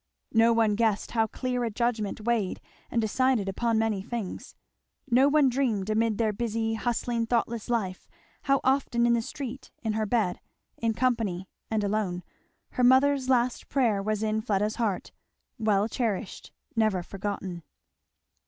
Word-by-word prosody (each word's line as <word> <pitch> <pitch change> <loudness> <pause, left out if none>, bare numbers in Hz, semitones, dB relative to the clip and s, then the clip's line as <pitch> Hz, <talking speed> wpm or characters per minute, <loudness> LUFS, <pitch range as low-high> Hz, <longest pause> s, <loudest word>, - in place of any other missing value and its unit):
No 225 0 +5
one 225 -2 +3
guessed 220 -1 0
how 225 -1 +2
clear 250 +1 -2
a 235 - 0
judgment 220 -2 -1
weighed 220 -4 0 0.3
and 235 - 0
decided 230 -1 +1
upon 230 +4 0
many 220 -3 +1
things. 220 -1 -6 0.6
No 260 +4 +5
one 295 -1 +4
dreamed, 235 -6 0
amid 220 -1 +1
their 220 -2 +1
busy, 225 +1 -1
hustling, 235 0 -1
thoughtless 235 -1 -1
life, 195 -6 -2 0.4
how 275 -1 +3
often, 260 -3 +2
in 240 - +4
the 235 - +2
street, 265 +2 -7
in 220 -2 0
her 215 0 -1
bed, 205 -6 +1 0.4
in 225 -1 -1
company 220 -8 0 0.2
and 220 -1 0
alone, 200 -3 -1 0.5
her 250 - -1
mother's 260 +1 +4
last 250 -1 +1
prayer 235 -7 +2
was 215 +1 -1
in 215 0 0
Fleda's 210 -1 0
heart; 215 -6 -1 0.5
well 210 -2 +2
cherished; 225 -4 -3 0.2
never 215 -5 +2
forgotten. 195 -2 -5
225 Hz, 150 wpm, -27 LUFS, 210-240 Hz, 0.6 s, No